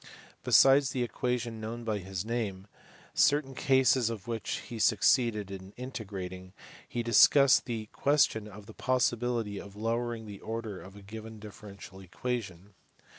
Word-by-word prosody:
Besides 135 0 +6
the 125 -2 -1
equation 120 -2 -3
known 115 +2 -5
by 110 -2 -2
his 95 0 -5
name, 110 -5 -3 0.5
certain 145 -2 +2
cases 130 -3 +3
of 115 -1 -7
which 115 -3 -3
he 115 -2 -7
succeeded 110 -3 +2
in 95 0 -9
integrating, 95 -7 -7 0.4
he 120 - -2
discussed 135 +4 +6
the 115 -3 -4
question 135 -7 +2
of 105 0 -12
the 110 - -12
possibility 120 -4 0
of 100 -1 -12
lowering 115 +1 -2
the 100 -2 -9
order 110 -3 -5
of 95 +1 -13
a 100 - -13
given 110 +2 -9
differential 100 -2 -11
equation. 100 -1 -5
110 Hz, 140 wpm, -30 LUFS, 100-120 Hz, 0.5 s, Besides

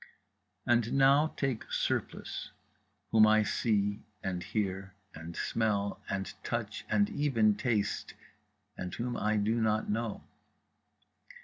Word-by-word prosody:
And 120 -2 +2
now 140 +3 +5
take 135 -5 -2
Surplice, - - -2 0.6
whom 110 -1 +7
I 110 0 +5
see 105 -1 0 0.2
and 90 -2 -2
hear 100 -1 -3 0.2
and 80 +1 -8
smell 100 -3 0
and 95 -1 -3
touch 115 -3 -3
and 205 -1 +3
even 120 - +3
taste, 110 -2 -1 0.6
and 90 - -5
whom 120 +1 -3
I 105 0 +1
do 110 +3 +1
not 110 -1 +1
know. 115 0 -2
110 Hz, 115 wpm, -31 LUFS, 100-120 Hz, 0.6 s, whom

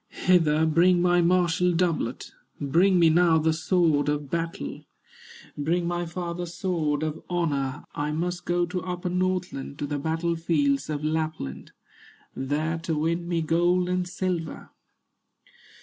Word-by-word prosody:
"Hither 160 -4 +4
bring 175 +3 +4
my 175 0 +3
martial 180 0 +2
doublet, 165 -8 -1 0.3
Bring 175 +7 +3
me 165 -2 +5
now 170 0 +4
the 160 0 +2
sword 160 -3 +2
of 145 -2 -2
battle, 165 - -4 0.7
Bring 170 +4 0
my 175 0 -2
father's 175 0 -5
sword 160 -6 -1
of 155 0 -3
honor; 145 -6 -1
I 150 +1 -2
must 175 +3 -3
go 175 0 +1
to 180 +1 -4
upper 180 +1 -4
Northland, 180 -6 -2
To - - -3
the 145 0 -3
battle 165 +3 -1
fields 145 -4 0
of 150 -1 -3
Lapland, 155 - -3 0.6
There 155 +5 -1
to 165 -1 -2
win 170 +3 -1
me 170 -2 0
gold 175 +3 +2
and 180 0 -1
silver." 180 -3 -3
165 Hz, 140 wpm, -26 LUFS, 155-175 Hz, 0.7 s, me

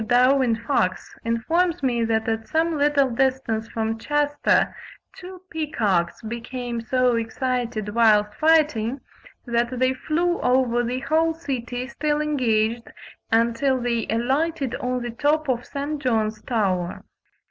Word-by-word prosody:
Darwin 250 0 +4
Fox 230 -5 -1
informs 320 +9 0
me 240 -3 +1
that 225 -1 0
at 225 0 -2
some 325 +1 +1
little 285 -2 +2
distance 245 -3 0
from 225 0 -3
Chester 290 +2 +1 0.4
two 370 0 -11
peacocks 215 - -1
became 235 +1 -5
so 250 +1 +2
excited 230 -1 -2
whilst 210 -2 +3
fighting, 300 -6 +2 0.5
that 240 +1 0
they 255 +1 +2
flew 340 +6 -1
over 250 -1 +2
the 250 +2 -2
whole 320 +3 +1
city, 255 -6 -4
still 295 +2 -1
engaged, 235 -6 0 0.4
until 235 +4 +2
they 235 -2 -1
alighted 270 +5 0
on 250 0 -2
the 240 - -4
top 295 +5 +1
of 245 -2 -1
St. 285 +1 -4
John's 220 -4 0
tower. 185 -7 -1
250 Hz, 125 wpm, -23 LUFS, 230-290 Hz, 0.5 s, Darwin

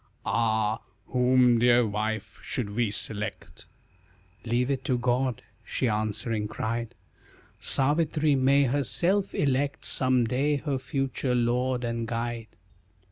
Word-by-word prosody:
"Ah, 110 0 +1 0.3
whom, 125 -1 +4
dear 120 0 +5
wife, 110 0 -3
should 110 -6 -4
we 115 +1 0
select?" 105 -2 -5 0.8
"Leave 120 +3 0
it 135 -1 -2
to 125 - 0
God," 125 0 0 0.2
she 130 - -1
answering 110 0 -1
cried, 115 +2 -4 0.6
"Savitri, 150 +2 +2
may 135 +1 +4
herself 145 - 0
elect 140 0 0
Some 130 -2 +2
day, 135 +6 +1
her 140 -2 -2
future 130 -1 -2
lord 125 +1 0
and 115 -1 -2
guide." 115 0 -3
125 Hz, 115 wpm, -27 LUFS, 115-135 Hz, 0.8 s, dear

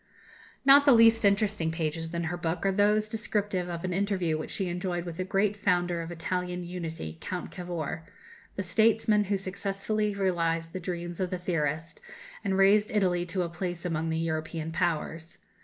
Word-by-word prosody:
Not 285 +1 +8
the 275 - +9
least 225 0 +6
interesting 200 -4 +2
pages 165 0 -3
in 170 0 -2
her 165 +2 -2
book 170 +1 -2
are 195 - +4
those 210 +2 +3
descriptive 205 -4 -2
of 170 0 -5
an 185 -1 -2
interview 190 -4 0
which 155 - -4
she 195 - -2
enjoyed 175 0 -2
with 170 -2 -6
the 185 - -1
great 195 +2 +1
founder 175 -4 +1
of 165 +1 -6
Italian 180 +1 -3
unity, 165 - -6
Count 180 -1 -5
Cavour 175 -4 -4 0.5
the 195 - -2
statesman 215 +1 +3
who 200 0 0
successfully 200 +2 -2
realized 165 -4 0
the 185 - -3
dreams 175 -1 -5
of 185 -1 0
the 185 - -2
theorist, 165 -2 -2 0.4
and 195 -2 0
raised 205 +2 +5
Italy 180 -4 +1
to 180 +1 -1
a 170 - -3
place 175 0 -4
among 165 -2 -1
the 160 - -1
European 160 0 -3
Powers. 165 -1 -2
180 Hz, 175 wpm, -28 LUFS, 165-200 Hz, 0.5 s, the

